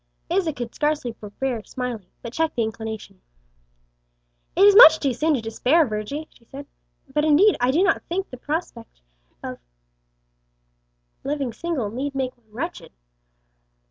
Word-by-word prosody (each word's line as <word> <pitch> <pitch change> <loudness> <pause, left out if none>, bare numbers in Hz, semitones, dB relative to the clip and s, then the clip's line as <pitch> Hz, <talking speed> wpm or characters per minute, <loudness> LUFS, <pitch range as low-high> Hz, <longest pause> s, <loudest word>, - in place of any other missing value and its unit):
Isa 350 -3 +1
could 240 -5 -6
scarce 300 0 0 0.2
forbear 225 +2 -4
smiling, 240 -4 -5 0.2
but 235 - -7
checked 320 +2 -1
the 235 - +1
inclination. 220 -3 -6 1.3
"It 380 - +4
is 405 -1 +7
much 320 -8 +10
too 275 -4 0
soon 305 +5 +1
to 250 - -2
despair, 255 +8 +2
Virgy," 215 +8 -4
she 235 - -24
said; 275 +4 -10 0.5
"but 300 - +1
indeed, 320 +7 +5
I 245 - +3
do 320 +8 +3
not 395 - +2
think 380 +3 -3
the 255 - -8
prospect 270 - -5 0.4
of - - -6 1.6
living 275 -4 -2
single 260 -6 -3
need 275 +4 -4
make 260 -1 -2
one 230 -3 -35
wretched." 280 +11 -6
270 Hz, 145 wpm, -23 LUFS, 230-315 Hz, 1.6 s, much